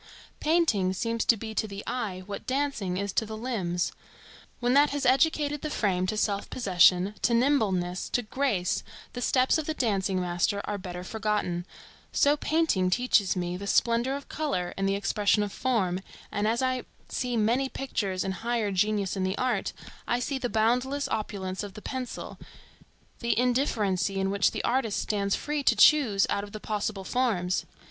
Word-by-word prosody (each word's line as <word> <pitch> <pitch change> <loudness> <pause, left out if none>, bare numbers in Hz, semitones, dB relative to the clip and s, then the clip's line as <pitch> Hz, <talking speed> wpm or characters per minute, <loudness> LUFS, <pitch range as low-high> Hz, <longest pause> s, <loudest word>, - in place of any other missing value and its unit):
Painting 300 - +2
seems 230 +3 -1
to 230 - +4
be 220 +1 -6
to 220 - -1
the 200 0 -7
eye 200 -7 -3
what 200 0 -7
dancing 255 -9 -1
is 200 0 -2
to - - +2
the 220 0 -6
limbs. 190 -8 -1 0.7
When 245 0 +1
that 285 +2 +6
has 285 -1 -2
educated 290 +2 +2
the 305 - -3
frame 185 -8 0
to 215 - -2
self 200 -1 0
possession, 185 -3 +4
to 235 - +3
nimbleness, 200 -9 +1
to 245 - 0
grace, 215 -6 0 0.3
the 245 - -5
steps 255 +4 +3
of 310 - -4
the 315 - -2
dancing 195 -7 0
master 180 +3 0
are 205 -1 -3
better 180 -1 -6
forgotten; 200 -4 -2 0.4
so 285 +1 +4
painting 300 - +1
teaches 210 -2 +2
me 180 0 -2
the 200 +2 -6
splendor 235 +5 +2
of 280 - -7
color 280 - -2
and 195 0 0
the 195 - +1
expression 205 +1 +2
of 205 - -4
form, 195 -9 0 0.3
and 205 +1 0
as 235 +3 +1
I 255 -1 0 0.2
see 245 -2 -2
many 240 +5 +2
pictures 200 -10 -2
and 190 - -2
higher 225 +1 -1
genius 200 0 +1
in 190 - -1
the 190 +2 -1
art, 250 -6 0 0.4
I 240 - +1
see 265 +2 -2
the 245 -2 -2
boundless 250 +6 +1
opulence 190 -3 -3
of 205 -2 -7
the - - -7
pencil, 260 -2 -5 0.8
the 235 -2 0
indifferency 220 -7 +1
in 190 0 0
which 200 0 +3
the - - -4
artist 240 -4 0
stands 200 -2 0
free 295 0 -2
to - - +3
choose 245 -11 +5
out 200 - -1
of 205 - -10
the 215 - -5
possible 210 -2 -3
forms. 190 -6 0
215 Hz, 180 wpm, -28 LUFS, 195-255 Hz, 0.8 s, that